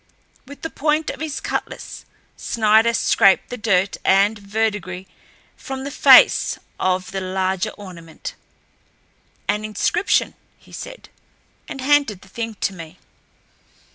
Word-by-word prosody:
With 285 +1 -12
the 325 - -4
point 305 +1 0
of 275 - -10
his 310 -1 -4
cutlass - - -5 0.3
Snider 220 +1 +3
scraped 195 -4 +3
the - - -3
dirt 200 -4 +1
and 200 +3 +3
verdigris 200 -3 -2 0.5
from 265 -1 -7
the 280 - -5
face - - +6 0.2
of 185 0 0
the 195 -1 -3
larger 190 +1 -1
ornament. 170 -5 -9 1.1
"An 210 - 0
inscription," 215 - 0 0.2
he - - -21
said, - - -9 0.6
and 270 - -6
handed 275 -8 +2
the 190 - -17
thing 230 +2 -5
to 195 - 0
me. 165 0 -11
210 Hz, 125 wpm, -21 LUFS, 190-265 Hz, 1.1 s, face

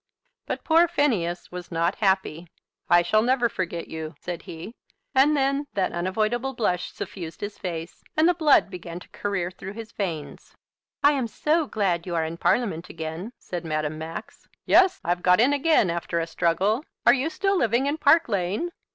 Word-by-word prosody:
But - - -4
poor 330 +1 +5
Phineas 230 - 0
was 180 0 -8
not 170 +2 +1
happy. 190 -4 0 0.4
"I 175 0 +6
shall 215 +5 +3
never 245 +1 +2
forget 175 -5 -4
you," 160 0 -6
said 175 -2 -5
he; 165 +7 -8 0.4
and 290 +3 +4
then 275 +1 +1
that 195 -2 0
unavoidable 215 +9 -1
blush 180 -6 -1
suffused 170 -4 -7
his 205 0 -5
face, 170 -2 -6
and 315 +2 +5
the 355 - +5
blood 305 - +4
began 175 -2 -7
to - - -15
career 195 -3 -2
through 190 +1 -8
his 225 0 -8
veins. 165 -7 -5 0.5
"I 290 - +7
am 270 -5 -1
so 305 +6 0
glad 185 -7 -1
you 175 - -2
are 165 -1 +1
in 165 +1 -5
Parliament 190 -4 0
again," 160 +6 -6
said 175 -2 -6
Madame 155 -1 -2
Max. 160 +1 -8 0.2
"Yes; 375 0 +5
I've 175 +1 0
got 180 +1 +4
in 260 +5 +4
again, 285 - +3
after 170 0 -2
a 165 - -1
struggle. 185 - +1 0.2
Are 240 - +8
you 275 +4 0
still 390 +3 0
living 240 - +2
in 290 +3 -1
Park 320 +3 +5
Lane?" 205 - -1
195 Hz, 180 wpm, -25 LUFS, 170-270 Hz, 0.5 s, Are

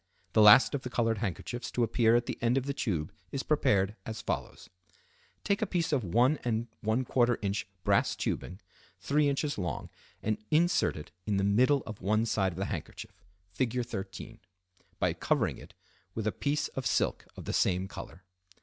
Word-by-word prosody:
The 110 - +5
last 105 +7 +8
of 140 - -1
the 125 - -5
colored 115 -3 0
handkerchiefs 120 +4 -4
to 120 - +1
appear 115 0 +3
at 120 0 +2
the - - -5
end 120 +2 +2
of 135 - 0
the 140 - -2
tube 85 - -2 0.2
is 135 - -3
prepared 105 -9 +2
as 110 +2 -6
follows:—Take 90 - -6
a 220 - +1
piece 170 -4 -1
of 135 - +2
1¼ 120 - +2
in. 115 -1 0 0.3
brass - - +2
tubing, 90 - -3 0.4
3 145 +9 +2
in. 140 - +1 0.2
long, 90 -7 -4 0.3
and 110 0 0
insert 170 - +2
it 75 - -9 0.2
in 105 -2 +1
the 95 - +1
middle 125 +8 +3
of 110 - -8
one 110 +4 +2
side 95 -4 +1
of 85 - -10
the 95 - -1
handkerchief 95 +3 -7 0.3
(Fig. 125 0 -1
13), 95 -5 -7 0.6
by - - +1
covering - - 0
it - - -14 0.4
with 110 - -3
a 110 - +2
piece 145 +6 -1
of 130 -2 -3
silk - - 0
of - - -8
the - - -3
same 95 0 +1
color. 95 -1 -10
115 Hz, 175 wpm, -30 LUFS, 100-130 Hz, 0.6 s, last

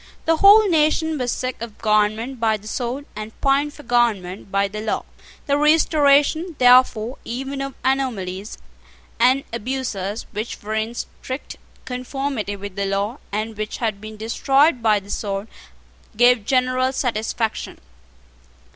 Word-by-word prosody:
The 325 0 +3
whole 410 +4 +7
nation 315 -2 +2
was 245 -1 -1
sick 255 -3 -4
of 230 -3 -7
government 215 +4 +1
by 220 -1 +2
the 210 +1 -13
sword, 250 +5 -3
and 215 +1 -8
pined 280 +1 +1
for 295 - -12
government 205 -7 0
by 200 0 +2
the 210 +2 -6
law. 215 - -2 0.4
The 285 -1 +1
restoration, 300 +2 +3
therefore, 250 -1 +4
even 270 +3 -4
of 275 -1 -5
anomalies 215 -8 -2 0.6
and 255 +3 +4
abuses, 230 -4 -3
which 215 +2 -5
were 215 +1 -4
in 220 +2 -2
strict 260 +3 -7 0.3
conformity 255 -4 -3
with 200 -1 -8
the 200 -1 -1
law, 200 +6 -2
and 215 +2 -3
which 215 0 -4
had 215 -4 -2
been 215 0 -9
destroyed 270 +5 +2
by 215 -2 +3
the 200 +1 -11
sword, 200 0 -3 0.7
gave 245 -2 +5
general 255 0 +2
satisfaction. 225 -3 -2
240 Hz, 140 wpm, -21 LUFS, 215-270 Hz, 0.7 s, whole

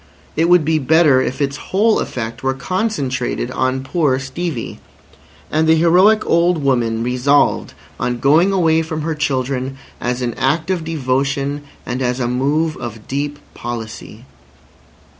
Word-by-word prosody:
It 165 +2 +2
would 175 -4 +5
be 160 0 +2
better 150 -1 +4
if 130 - -3
its 140 0 -1
whole 210 +8 +1
effect 115 -2 -4
were 135 0 0
concentrated 135 - -2
on 130 0 -1
poor 145 -2 +1
Stevie. 135 0 -4 0.7
And 160 +1 +2
the 160 - +6
heroic 180 +7 +4
old 170 -2 +2
woman 115 -4 +1
resolved 125 +4 +1 0.2
on 125 0 -1
going 155 +9 +4
away 165 -4 +3
from 160 -1 -4
her 165 +1 -1
children 135 -2 -2 0.2
as 125 +1 -2
an 120 -1 -1
act 155 +6 +1
of 180 -3 -1
devotion 140 -1 -1 0.2
and 125 +1 -3
as 125 0 0
a 120 - 0
move 145 +6 0
of 115 -2 -8
deep 145 +2 -3 0.2
policy. 115 0 -7
140 Hz, 145 wpm, -18 LUFS, 125-160 Hz, 0.7 s, the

